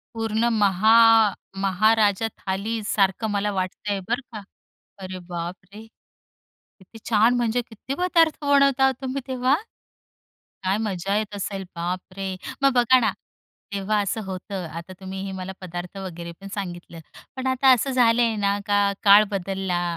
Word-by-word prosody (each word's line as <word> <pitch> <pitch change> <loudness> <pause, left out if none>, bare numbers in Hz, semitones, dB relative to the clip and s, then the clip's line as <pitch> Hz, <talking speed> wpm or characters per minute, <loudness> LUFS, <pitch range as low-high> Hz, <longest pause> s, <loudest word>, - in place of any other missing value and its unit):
पूर्ण 225 +1 0
महा 205 +2 +4 0.7
महाराजा 210 +2 +3
थालीसारखं 205 +1 -1
मला 205 0 0
वाटतंय 195 +2 -3
बरं 240 +4 -1
का. 210 -2 -7 0.6
अरे 185 -1 -7
बापरे! 180 +5 -7 0.9
किती 195 +4 -15
छान, 225 +3 +4
म्हणजे 240 0 0
किती 235 +4 -7
पदार्थ 335 -3 +3
बनवता 275 -2 +4
तुम्ही 265 +1 -3
तेव्हा? 260 +1 +1 1.1
काय 190 +2 +1
मजा 200 -2 -2
येत 210 -1 -4
असेल? 195 -1 -4
बापरे! 185 +2 -4 0.3
मग 275 -1 +5
बघा 245 +1 +5
ना, 215 -4 +1 0.6
तेव्हा 205 +2 0
असं 210 +3 -2
होतं, 190 0 -6
आता 170 +3 -8
तुम्ही 190 0 -6
हे 190 - -5
मला 190 0 -6
पदार्थ 175 +1 -7
वगैरे 170 -3 -7
पण 195 - -9
सांगितलं. 175 -4 -7 0.4
पण 260 0 -4
आता 260 +1 +2
असं 270 +3 -2
झालंय 235 -2 +3
ना, 200 0 0
का 205 -1 +2
काळ 205 +1 +8
बदलला. 190 -2 -2
205 Hz, 135 wpm, -23 LUFS, 190-230 Hz, 1.1 s, काळ